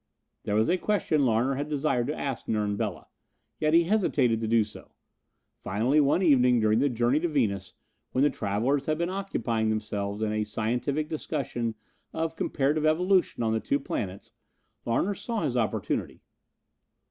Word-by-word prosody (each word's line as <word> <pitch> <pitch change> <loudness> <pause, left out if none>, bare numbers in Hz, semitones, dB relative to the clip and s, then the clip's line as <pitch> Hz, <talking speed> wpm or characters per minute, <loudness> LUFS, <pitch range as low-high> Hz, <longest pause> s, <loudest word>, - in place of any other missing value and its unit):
There 105 - 0
was 110 +1 +3
a 180 +2 +2
question 160 -10 +1
Larner 120 +4 +2
had 145 +3 -3
desired 135 -5 0
to 150 - -3
ask 135 -4 -4
Nern 105 -2 0
Bela, 100 -4 -4 0.5
yet 155 +1 +2
he 170 - +6
hesitated 150 - +1
to 110 - -1
do 115 0 +4
so. 105 0 -13 0.6
Finally 115 +10 0
one 145 +6 +2
evening 125 -6 +5
during 110 0 +3
the 140 +2 +2
journey 120 +3 +1
to 175 - 0
Venus, 100 - -1 0.4
when 130 - +2
the 145 - +4
travelers 120 +6 -1
had 155 0 +1
been 170 +2 -1
occupying 115 - -1
themselves 105 -1 -2
in 105 - 0
a 110 0 0
scientific 120 +8 -1
discussion 130 -7 -3 0.4
of 160 0 -2
comparative 150 +1 0
evolution 175 -2 +2
on 110 -1 +1
the 110 - +1
two 140 - 0
planets, 95 -2 -5 0.6
Larner 145 - +1
saw 210 +2 -3
his 125 - -1
opportunity. 115 -3 -2
125 Hz, 165 wpm, -27 LUFS, 110-155 Hz, 0.6 s, he